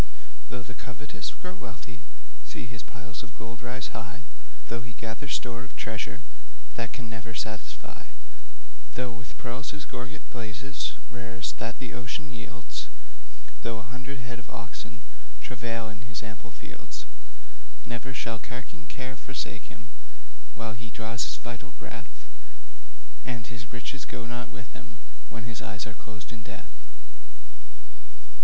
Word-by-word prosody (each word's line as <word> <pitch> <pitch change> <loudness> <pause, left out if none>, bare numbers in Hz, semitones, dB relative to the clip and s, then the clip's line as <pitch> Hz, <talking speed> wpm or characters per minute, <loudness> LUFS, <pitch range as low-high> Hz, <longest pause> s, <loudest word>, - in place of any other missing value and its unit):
Though 125 0 +2
the 125 - -3
covetous 125 +3 0
grown 185 +1 -2
wealthy 120 +2 -3 0.4
See - - 0
his 115 0 -1
piles 115 -2 -2
of 120 +1 -6
gold 115 +3 -2
rise 125 +2 +2
high; 115 +2 0 0.5
Though 115 0 +3
he 120 0 -3
gather 115 +5 +1
store 120 -3 +5
of 135 - -7
treasure 110 +2 +3 0.5
That 115 -1 +3
can 125 -3 0
never 115 0 -1
satisfy; 110 0 +1 0.9
Though 125 -1 +5
with 115 -1 -4
pearls 130 +3 +2
his 150 -1 0
gorget 140 +5 -1
blazes, 120 +4 +3 0.2
Rarest 120 -1 +2
that 115 +1 +3
the 125 -4 0
ocean 135 +3 +2
yields; 115 - 0 0.7
Though 115 -1 +4
a 110 +1 -3
hundred 130 +2 0
head 120 0 +1
of 125 - -7
oxen 115 - -2 0.4
Travail 115 -2 +3
in 110 - -5
his 110 0 +2
ample 110 +2 -3
fields; 115 - -3 0.8
Ne'er 130 +3 +1
shall 115 -1 +4
carking 135 +8 -2
care 130 -3 +1
forsake 130 -5 +1
him 115 - -6 0.7
While 110 0 +2
he 115 +1 -2
draws 115 +2 +4
this - - +3
vital 125 +3 -2
breath, - - -4 1.0
And 120 -2 +2
his 115 0 -2
riches 125 +2 +1
go 115 - 0
not 120 +1 +1
with 110 - -4
him, - - -6 0.3
When 115 -1 0
his 115 -1 +1
eyes 105 -1 +2
are 110 - 0
closed 110 0 -4
in 115 - -2
death. - - -4
120 Hz, 150 wpm, -36 LUFS, 115-125 Hz, 1.0 s, store